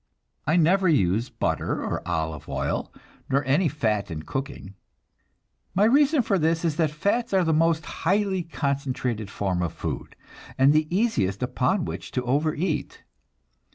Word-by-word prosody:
I 155 Hz, -, +3 dB
never 180 Hz, +3 st, +4 dB
use 115 Hz, -, +2 dB
butter -, -, -2 dB
or -, -, -2 dB
olive 80 Hz, -3 st, -3 dB
oil, -, -, -2 dB, 0.4 s
nor 135 Hz, 0 st, +1 dB
any 145 Hz, +7 st, +3 dB
fat 110 Hz, -9 st, -1 dB
in 80 Hz, -2 st, -5 dB
cooking. 135 Hz, -, -5 dB, 1.0 s
My 195 Hz, -, +4 dB
reason 280 Hz, +4 st, +4 dB
for 200 Hz, -4 st, +1 dB
this 165 Hz, +1 st, +1 dB
is 160 Hz, -2 st, 0 dB
that 160 Hz, -3 st, +2 dB
fats 200 Hz, -, -1 dB
are 185 Hz, -, +4 dB
the 160 Hz, -1 st, +2 dB
most 160 Hz, 0 st, +2 dB
highly 190 Hz, +1 st, 0 dB
concentrated 135 Hz, -, -2 dB
form 95 Hz, -3 st, -1 dB
of 85 Hz, -, -2 dB
food, -, -, -5 dB, 0.4 s
and 135 Hz, +2 st, +5 dB
the 155 Hz, 0 st, +2 dB
easiest 130 Hz, -, 0 dB
upon 160 Hz, +8 st, 0 dB
which -, -, -6 dB
to 125 Hz, -, -1 dB
overeat. 150 Hz, +4 st, -1 dB
150 Hz, 150 wpm, -25 LUFS, 125-180 Hz, 1.0 s, and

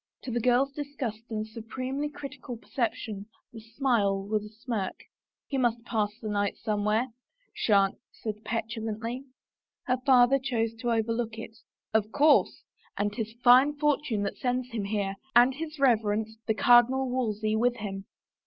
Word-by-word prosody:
To 255 Hz, -, -5 dB
the 240 Hz, -, 0 dB
girl's 250 Hz, +3 st, +3 dB
disgusted 270 Hz, -6 st, -5 dB
and 215 Hz, -1 st, -3 dB
supremely 255 Hz, +6 st, -4 dB
critical 275 Hz, -4 st, -8 dB
percep 235 Hz, 0 st, -1 dB
tion 205 Hz, -2 st, -7 dB, 0.3 s
the 225 Hz, -, -8 dB
smile 220 Hz, -4 st, 0 dB
was 210 Hz, +1 st, -1 dB
a 210 Hz, -, -9 dB
smirk. 220 Hz, -3 st, -4 dB, 0.5 s
"He 275 Hz, -, -2 dB
must 240 Hz, -2 st, +1 dB
pass 215 Hz, -4 st, 0 dB
the 220 Hz, -, -6 dB
night 205 Hz, -1 st, -1 dB
somewhere," 215 Hz, +3 st, 0 dB, 0.4 s
she -, -, -1 dB
answered 210 Hz, +2 st, 0 dB
petulantly. 225 Hz, +2 st, -3 dB, 0.6 s
Her 255 Hz, -1 st, +1 dB
father 260 Hz, 0 st, +5 dB
chose 230 Hz, -4 st, -1 dB
to 240 Hz, -1 st, -1 dB
overlook 230 Hz, 0 st, -1 dB
it. 225 Hz, 0 st, -8 dB, 0.2 s
" -, -, -55 dB
Of 220 Hz, -1 st, +1 dB
course 295 Hz, +3 st, +4 dB, 0.2 s
— -, -, -34 dB
and 205 Hz, 0 st, 0 dB
• -, -, -12 dB
'tis 225 Hz, -1 st, -4 dB
fine 260 Hz, +4 st, +7 dB
fortune 290 Hz, -8 st, +1 dB
that 200 Hz, -, -3 dB
sends 250 Hz, 0 st, -1 dB
him 220 Hz, -4 st, -3 dB
here, 200 Hz, -1 st, -2 dB, 0.2 s
and 245 Hz, +2 st, +7 dB
his 310 Hz, +2 st, -6 dB
reverence, 220 Hz, -4 st, +2 dB
the 220 Hz, -, +2 dB
Cardinal 245 Hz, +3 st, +5 dB
Wolsey, 220 Hz, -4 st, -1 dB
with 240 Hz, +2 st, +2 dB
him. 195 Hz, -3 st, -6 dB
230 Hz, 160 wpm, -28 LUFS, 215-255 Hz, 0.6 s, fine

